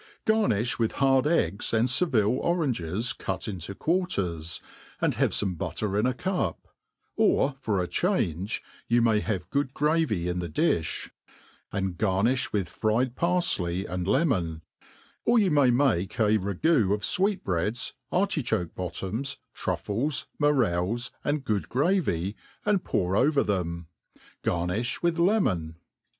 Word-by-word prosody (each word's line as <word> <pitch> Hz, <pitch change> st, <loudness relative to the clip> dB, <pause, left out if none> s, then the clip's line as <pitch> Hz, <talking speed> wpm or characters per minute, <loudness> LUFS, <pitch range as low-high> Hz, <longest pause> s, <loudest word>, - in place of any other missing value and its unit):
Garniftx 125 Hz, -, +2 dB
with 115 Hz, -1 st, 0 dB
bard 135 Hz, 0 st, +3 dB
eggs 105 Hz, -, +1 dB
and 115 Hz, +2 st, +3 dB
Sevrlfe 125 Hz, -, +2 dB
oranges 120 Hz, -, 0 dB
cut 95 Hz, -1 st, -4 dB
into 95 Hz, -1 st, -5 dB
quarters, 95 Hz, -, -1 dB, 0.4 s
and -, -, +1 dB
have -, -, +2 dB
ibme 95 Hz, -3 st, -1 dB
butter 95 Hz, +4 st, -2 dB
in 105 Hz, +4 st, +2 dB
a 130 Hz, -, +1 dB
cop: 185 Hz, +6 st, -2 dB, 0.5 s
or 140 Hz, -, +3 dB
for 100 Hz, -8 st, 0 dB
change^ 100 Hz, -, -1 dB, 0.3 s
you 120 Hz, +1 st, +3 dB
m^y 110 Hz, -2 st, +3 dB
have 95 Hz, -6 st, -3 dB
good 140 Hz, -1 st, -1 dB
gravy 150 Hz, -, +1 dB
in 90 Hz, 0 st, -1 dB
the 85 Hz, -1 st, -4 dB
difli, 75 Hz, -, 0 dB, 0.6 s
and 95 Hz, -3 st, -2 dB
garnifh 110 Hz, +6 st, +1 dB
with 100 Hz, -4 st, 0 dB
fried 115 Hz, +3 st, 0 dB
parfley 170 Hz, -, +1 dB
and 90 Hz, 0 st, -3 dB
kmon; 95 Hz, -, +1 dB, 0.7 s
•or 235 Hz, 0 st, +5 dB
you 195 Hz, -5 st, +3 dB
may 145 Hz, -4 st, +5 dB
make 120 Hz, -8 st, +1 dB
a 110 Hz, -1 st, +3 dB
ragoo 100 Hz, -, +2 dB
of 105 Hz, -, -8 dB
fwectbreads^ 120 Hz, -, 0 dB, 0.2 s
articboke 150 Hz, -, 0 dB
lx)ttoms,' 95 Hz, +8 st, -4 dB, 0.2 s
truffles, 130 Hz, +7 st, -1 dB
morels, 120 Hz, -, +1 dB
and 145 Hz, -1 st, -1 dB
good 105 Hz, -6 st, -1 dB
gravy, 125 Hz, -, +1 dB, 0.3 s
aitd^ 205 Hz, -3 st, +2 dB
pour 90 Hz, -, 0 dB
over 140 Hz, +5 st, +3 dB
them. 85 Hz, -4 st, -2 dB, 0.6 s
Gar 85 Hz, -1 st, 0 dB
nifli 115 Hz, -, -2 dB
with 170 Hz, 0 st, +1 dB
lemon. 105 Hz, -, +1 dB
110 Hz, 135 wpm, -27 LUFS, 90-145 Hz, 0.7 s, or